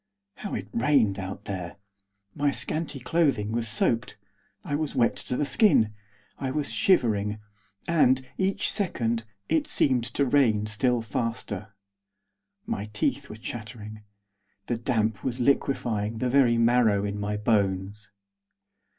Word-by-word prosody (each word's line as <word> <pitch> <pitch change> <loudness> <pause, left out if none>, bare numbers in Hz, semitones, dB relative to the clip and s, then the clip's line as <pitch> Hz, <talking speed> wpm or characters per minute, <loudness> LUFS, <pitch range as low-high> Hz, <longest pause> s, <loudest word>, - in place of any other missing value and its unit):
How 205 - -5
it 100 -2 -5
rained 115 -6 +2
out 95 +1 -6
there! 90 -2 -5 0.6
My 145 0 +1
scanty 150 0 -1
clothing 130 -6 +1
was 115 0 -1
soaked; 115 +1 +1 0.5
I 160 -7 -5
was 150 0 -1
wet 120 -3 +3
to 125 - -3
the 145 - +1
skin! 140 - +4 0.5
I 135 - -2
was 145 +2 -2
shivering. 110 - +2 0.5
And, 130 -6 +3
each 195 +1 +1
second, 115 - 0 0.2
it 160 -2 +1
seemed 130 -4 +2
to 140 - +2
rain 120 -6 +3
still 115 +2 0
faster. 110 -2 -4 0.9
My 100 - -3
teeth 105 +6 -2
were - - -7
chattering. 110 -1 -8 0.6
The 120 - -2
damp 110 -3 -1
was 130 -1 -2
liquefying 115 -5 0
the 125 +2 -1
very 125 -4 +4
marrow 115 -4 +3
in 100 0 -3
my 105 0 -2
bones. 100 -1 0
115 Hz, 135 wpm, -26 LUFS, 105-135 Hz, 0.9 s, skin